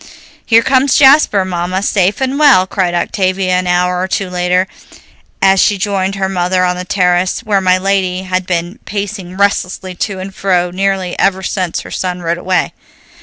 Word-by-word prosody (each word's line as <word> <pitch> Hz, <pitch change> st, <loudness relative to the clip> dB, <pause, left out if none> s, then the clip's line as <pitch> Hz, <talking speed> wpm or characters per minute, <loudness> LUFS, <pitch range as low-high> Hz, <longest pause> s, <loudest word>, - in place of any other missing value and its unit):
"Here 230 Hz, 0 st, +4 dB
comes 265 Hz, +1 st, +2 dB
Jasper, 270 Hz, -8 st, +5 dB
Mamma, 185 Hz, +1 st, -3 dB
safe 200 Hz, +3 st, +1 dB
and 265 Hz, +2 st, -1 dB
well," 275 Hz, -11 st, +5 dB
cried 185 Hz, -2 st, -1 dB
Octavia 185 Hz, +1 st, -1 dB
an 185 Hz, -, -4 dB
hour 180 Hz, 0 st, +1 dB
or 185 Hz, -, -1 dB
two 190 Hz, -1 st, -3 dB
later, 180 Hz, +1 st, +1 dB, 0.8 s
as 195 Hz, 0 st, +4 dB
she 205 Hz, -, +3 dB
joined 195 Hz, -1 st, -1 dB
her 195 Hz, -1 st, -1 dB
mother 185 Hz, 0 st, 0 dB
on 180 Hz, 0 st, 0 dB
the 180 Hz, -, -5 dB
terrace, 180 Hz, -1 st, +1 dB
where 205 Hz, -3 st, 0 dB
my 185 Hz, 0 st, +3 dB
lady 190 Hz, -1 st, -1 dB
had 185 Hz, 0 st, -2 dB
been 175 Hz, +4 st, -3 dB
pacing 200 Hz, -3 st, -5 dB
restlessly 190 Hz, -2 st, -1 dB
to 190 Hz, +2 st, -4 dB
and 190 Hz, +1 st, -7 dB
fro 180 Hz, -2 st, 0 dB
nearly 190 Hz, -1 st, -1 dB
ever 190 Hz, -1 st, +1 dB
since 180 Hz, -2 st, -2 dB
her -, -, -11 dB
son 180 Hz, -1 st, -4 dB
rode 170 Hz, +1 st, -1 dB
away. 185 Hz, 0 st, -1 dB
185 Hz, 175 wpm, -14 LUFS, 180-195 Hz, 0.8 s, Jasper